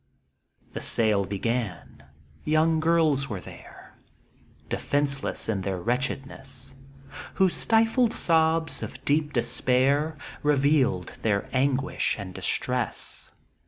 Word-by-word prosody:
The - - -5
sale 105 -3 +1
began 105 -5 -3 0.2
— - - -30 0.2
young 160 +1 +3
girls 155 -4 +2
were 100 -4 -3
there, - - -13 0.7
Defenceless 140 -1 -1
in 105 -4 -1
their 95 -1 -2
wretchedness, 130 +3 -3 0.6
Whose 190 -2 +3
stifled 225 +1 +3
sobs 160 -1 +2
of - - -8
deep 150 +1 +1
despair 130 +5 +1 0.2
Revealed 140 -9 +2
their 100 -3 0
anguish 135 +2 +1
and 95 -3 -7
distress. - - -3
135 Hz, 100 wpm, -26 LUFS, 115-155 Hz, 0.7 s, young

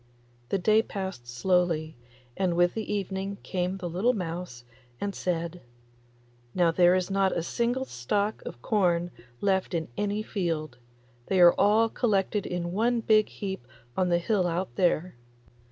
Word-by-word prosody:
The - - +1
day 215 +4 +4
passed 190 - -6
slowly, 160 +4 0 0.4
and 185 -3 0
with 175 0 +3
the 220 -1 -4
evening 195 0 -3
came 185 0 -2
the 180 -2 -5
little 190 +9 +1
mouse 170 - -5 0.4
and 200 -1 -2
said, 170 -1 -3 0.9
'Now 175 -2 +4
there 175 +1 +5
is 185 +1 -1
not 195 -1 +2
a 165 - -1
single 240 +7 -1
stalk 200 - -1
of 120 - -9
corn 175 -4 +1 0.3
left 190 -2 +1
in 160 -3 -2
any 205 +1 -1
field; 160 - -3 0.5
they 190 - +1
are 175 -1 +8
all 215 +3 +4
collected 210 -3 0
in 175 -1 -3
one 230 +5 +1
big 215 -1 +4
heap 190 -12 -6 0.3
on 185 -1 +1
the 175 - +3
hill 185 +1 +1
out 175 +2 -3
there. 175 -4 +1
185 Hz, 155 wpm, -27 LUFS, 170-205 Hz, 0.9 s, are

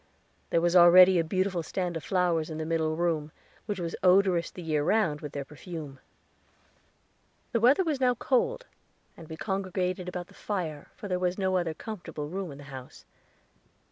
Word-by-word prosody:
There 170 - +2
was 175 +1 +1
already 180 +1 +8
a - - +2
beautiful 185 +1 -1
stand 175 +1 -3
of 165 - -5
flowers 175 -3 +1
in 155 - -5
the 160 - -3
middle 160 -1 0
room, 160 -3 -1 0.4
which 205 -3 -3
was 170 -1 -3
odorous 185 -2 +4
the 180 - -10
year 155 -2 0
round 160 -5 +1
with 150 -1 -7
their 140 -1 -4
perfume. 150 -2 -9 1.5
The 230 - +1
weather 260 - +5
was 300 -6 -2
now 250 -1 +3
cold, - - 0 0.5
and 165 - -13
we 160 - -7
congregated 185 -1 -2
about 180 -1 -5
the - - -20
fire; 165 -8 -4
for 205 - -8
there 180 -2 -1
was 180 0 0
no 190 -2 0
other 170 -3 0
comfortable 175 -9 -7
room 185 -1 -4
in 140 - -10
the 145 - -11
house. 130 -1 -10
175 Hz, 180 wpm, -28 LUFS, 160-190 Hz, 1.5 s, already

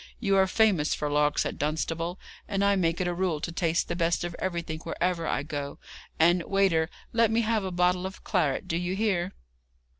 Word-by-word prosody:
You 195 -4 +2
are 190 0 +5
famous 190 -7 +2
for 150 -1 -2
larks 150 0 +2
at - - -4
Dunstable, 165 +4 -2 0.3
and 200 -1 0
I 200 0 +4
make 170 -3 +1
it 185 - 0
a 175 - 0
rule 175 -3 0
to 170 - -4
taste 170 -1 0
the - - -2
best 170 0 +1
of 175 -1 -4
everything 170 -4 -3
wherever 170 +1 -2
I 135 - 0
go; 145 -1 -5 0.4
and, 170 +2 +5
waiter, 175 -4 +2 0.2
let 230 -1 +4
me 225 +1 +2
have 220 -2 +1
a 190 - -2
bottle 180 +1 +1
of 190 - -11
claret. 160 -10 0
Do 165 - -1
you 180 +2 -2
hear?' 195 -4 0
175 Hz, 205 wpm, -27 LUFS, 165-190 Hz, 0.4 s, are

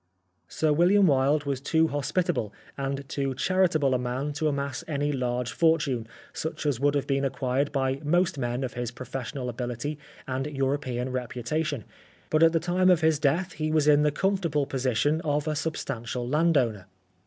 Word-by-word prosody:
Sir 155 -1 +1
William 185 +6 +5
Wilde 145 0 +3
was 140 -2 -2
too 160 +3 +2
hospitable 145 - -1 0.2
and 135 0 -3
too 135 -2 -2
charitable 170 -5 +2
a 125 - +1
man 130 +4 -2
to 155 +2 -1
amass 140 -4 -2
any 145 -1 -1
large 125 -2 -1
fortune 150 -8 +1 0.3
such 160 0 -4
as 140 -5 +1
would 145 +1 +2
have 140 - 0
been 135 0 0
acquired 135 +1 0
by 135 -1 -1
most 175 +1 +1
men 120 +1 -2
of 130 - -4
his 120 -1 -3
professional 125 +1 -6
ability 125 +4 -4 0.3
and 135 +1 -2
European 135 -3 -2
reputa 125 +4 -2
tion, 145 -8 -3 0.5
but 155 - +3
at 165 0 +7
the 165 - +2
time 180 +2 +2
of 175 -2 +4
his 160 -2 +3
death 160 +6 +1
he 155 0 -2
was 155 -1 +2
in 150 -1 +6
the 150 - +4
comfortable 170 -3 0
position 135 +4 0
of 150 -1 -1
a 155 - 0
substantial 125 -6 -3
landowner. 130 - +1
140 Hz, 175 wpm, -27 LUFS, 130-155 Hz, 0.5 s, at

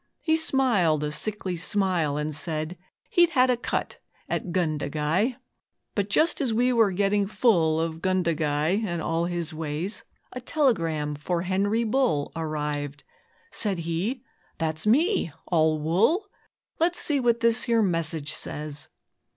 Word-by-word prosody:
He 320 -1 +3
smiled 235 - +2
a 150 - -2
sickly 190 +3 -3
smile, 175 -4 0
and 150 +1 -2
said 155 +2 -2 0.4
He'd 345 -1 +5
'had 255 -5 +4
a - - +3
cut 240 - -3 0.3
at 180 - -3
"Gundagai"!' 160 - 0 0.6
But 205 -1 -1
just 315 +10 +2
as 260 -4 +1
we 250 +2 +3
were 225 -3 +4
getting 200 +1 +1
full 170 -8 +2
Of 165 0 -3
'Gundagai' 170 0 +1
and 175 -5 -2
all 165 +1 -1
his 170 -2 -2
ways, 160 +5 -3 0.3
A 255 - -6
telegram 165 - 0
for 170 +4 -2
'Henry 200 +5 +1
Bull' 225 - +1
Arrived. 150 -3 -3 0.5
Said 205 -4 0
he, 195 +10 -2 0.3
'That's 160 +2 -1
me 305 - +3 0.2
all 160 -2 +3
wool! 205 - +2 0.5
Let's 345 +2 +2
see 290 -2 +2
what 235 -2 +2
this 230 0 +4
here 230 -3 +3
message 160 -4 -1
says.' 150 -2 -5
180 Hz, 140 wpm, -26 LUFS, 155-230 Hz, 0.6 s, He'd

